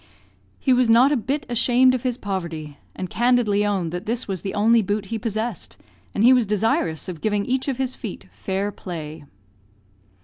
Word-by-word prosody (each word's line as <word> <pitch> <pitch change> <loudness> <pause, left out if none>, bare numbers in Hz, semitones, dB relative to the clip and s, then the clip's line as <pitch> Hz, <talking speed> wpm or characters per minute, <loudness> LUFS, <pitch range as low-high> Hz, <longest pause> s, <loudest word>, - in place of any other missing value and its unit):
He 260 - +2
was 250 -2 +3
not 245 +5 +6
a - - +3
bit 275 +4 -2
ashamed 250 +1 +3
of 255 - -1
his 250 -1 -1
poverty, 170 - -5 0.2
and 185 - -4
candidly 235 -2 +2
owned 195 -5 -1
that 180 +4 -6
this 240 +2 -2
was 190 -3 -3
the 195 0 -4
only 225 +3 +4
boot 205 +1 -2
he 225 - -1
possessed, 220 +2 -4 0.4
and 205 - +1
he 250 +3 +8
was 245 -4 +3
desirous 200 -7 0
of 170 -4 -7
giving 210 -2 0
each 260 +2 -1
of 270 -3 -1
his 260 -1 -1
feet 220 -7 -7
fair 195 +2 -3
play. 160 -6 -8
215 Hz, 190 wpm, -23 LUFS, 190-245 Hz, 0.4 s, he